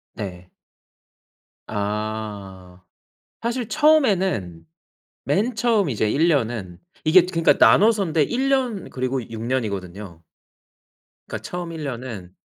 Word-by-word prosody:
네. 90 Hz, -4 st, -7 dB, 1.2 s
아. 105 Hz, -3 st, -5 dB, 0.6 s
사실 235 Hz, 0 st, -2 dB
처음에는 190 Hz, -, +2 dB, 0.6 s
맨 205 Hz, -, 0 dB
처음 225 Hz, -, +2 dB
이제 110 Hz, -3 st, 0 dB
1 155 Hz, +9 st, +2 dB
년은 115 Hz, -, -1 dB, 0.2 s
이게 175 Hz, +3 st, +6 dB
그니까 165 Hz, -2 st, +3 dB
나눠서인데 195 Hz, -7 st, +4 dB
1 260 Hz, -, -1 dB
년 250 Hz, -8 st, 0 dB
그리고 130 Hz, 0 st, -2 dB
6 115 Hz, -1 st, -7 dB
년이거든요. 100 Hz, -7 st, -4 dB, 1.0 s
그러니까 -, -, -5 dB
처음 175 Hz, -1 st, -5 dB
1 160 Hz, -2 st, -6 dB
년은 115 Hz, -9 st, -6 dB
130 Hz, 200 characters per minute, -22 LUFS, -, 1.2 s, 이게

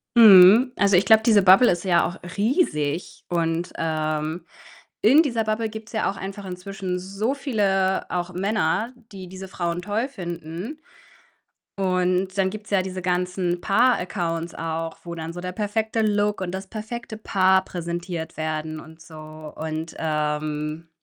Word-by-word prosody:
Mhm. 215 Hz, +2 st, +8 dB
Also, 200 Hz, -1 st, +4 dB
ich 185 Hz, +2 st, +4 dB
glaube, 220 Hz, +2 st, +6 dB
diese 215 Hz, -3 st, +6 dB
Bubble 190 Hz, +6 st, +7 dB
ist 175 Hz, -1 st, -2 dB
ja 175 Hz, -3 st, +3 dB
auch 175 Hz, -, -4 dB, 0.2 s
riesig. 185 Hz, -, 0 dB
Und 170 Hz, 0 st, -1 dB
ähm, 155 Hz, +1 st, -2 dB, 0.6 s
in 270 Hz, +8 st, +6 dB
dieser 240 Hz, -8 st, 0 dB
Bubble 215 Hz, +1 st, -1 dB
gibt's 220 Hz, 0 st, -9 dB
ja 220 Hz, -, 0 dB
auch 195 Hz, -, -11 dB
einfach 195 Hz, +1 st, -7 dB
inzwischen 185 Hz, 0 st, -5 dB
so 195 Hz, +7 st, -2 dB
viele 195 Hz, -9 st, 0 dB
auch 180 Hz, 0 st, -3 dB
Männer, 210 Hz, +4 st, 0 dB, 0.2 s
die 190 Hz, -2 st, -9 dB
diese 190 Hz, +1 st, -9 dB
Frauen 175 Hz, -1 st, -3 dB
toll 210 Hz, +6 st, -1 dB
finden 175 Hz, -, -7 dB, 1.0 s
und 185 Hz, 0 st, 0 dB
dann 190 Hz, -1 st, +2 dB
gibt's 210 Hz, +1 st, -9 dB
ja 195 Hz, -2 st, +2 dB
diese 185 Hz, 0 st, -5 dB
ganzen 180 Hz, 0 st, -1 dB
Paar-Accounts 180 Hz, -7 st, +1 dB
auch, 165 Hz, 0 st, -4 dB
wo 170 Hz, -1 st, -6 dB
dann 165 Hz, 0 st, -6 dB
so 175 Hz, -, -7 dB
der 180 Hz, 0 st, -5 dB
perfekte 220 Hz, +3 st, -1 dB
Look 210 Hz, -1 st, +1 dB
und 180 Hz, -, -3 dB
das 190 Hz, +1 st, -5 dB
perfekte 220 Hz, +2 st, -7 dB
Paar 190 Hz, -3 st, +2 dB
präsentiert 170 Hz, -1 st, -5 dB
werden 155 Hz, 0 st, -3 dB
und 160 Hz, +1 st, -15 dB
so 160 Hz, 0 st, -13 dB, 0.4 s
und, 160 Hz, +1 st, -5 dB
ähm 150 Hz, 0 st, -2 dB
185 Hz, 150 wpm, -23 LUFS, 170-210 Hz, 1.0 s, Mhm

